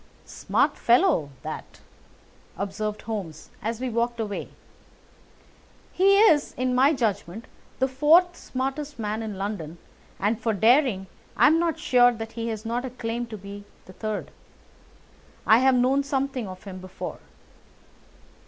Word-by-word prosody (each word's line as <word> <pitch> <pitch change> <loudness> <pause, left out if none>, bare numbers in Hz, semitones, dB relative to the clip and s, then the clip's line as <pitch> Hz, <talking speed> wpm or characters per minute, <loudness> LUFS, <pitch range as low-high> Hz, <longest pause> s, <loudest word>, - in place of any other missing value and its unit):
"Smart - - 0
fellow, 240 - +3
that," - - -7 0.8
observed 210 +2 -4
Holmes 190 -9 -6
as 225 +2 -3
we 260 - -2
walked 235 0 -1
away. 205 -3 -4 1.4
"He 395 +2 +4
is, 315 -10 +4
in 255 0 0
my 265 +4 +5
judgment, 220 - -2 0.3
the 265 - +2
fourth 315 +7 +4
smartest 275 +3 -4
man 215 0 -3
in 215 -3 -5
London, 195 -5 -5 0.4
and 210 +3 0
for 225 0 0
daring 225 -1 +3 0.3
I - - +6
am 320 +2 +5
not 335 -3 0
sure 245 -1 +4
that 225 -1 -7
he 230 0 -4
has 220 -1 -4
not 235 +2 -2
a 260 - -4
claim 235 -1 -4
to 220 -2 -7
be 200 +1 -9 0.2
third. 210 +3 -5 1.1
I 220 +2 +6
have 260 0 +4
known 255 +3 +3
something 270 -4 -2
of 185 0 -10
him 190 -2 -8
before." 185 0 -7
230 Hz, 140 wpm, -25 LUFS, 210-265 Hz, 1.4 s, I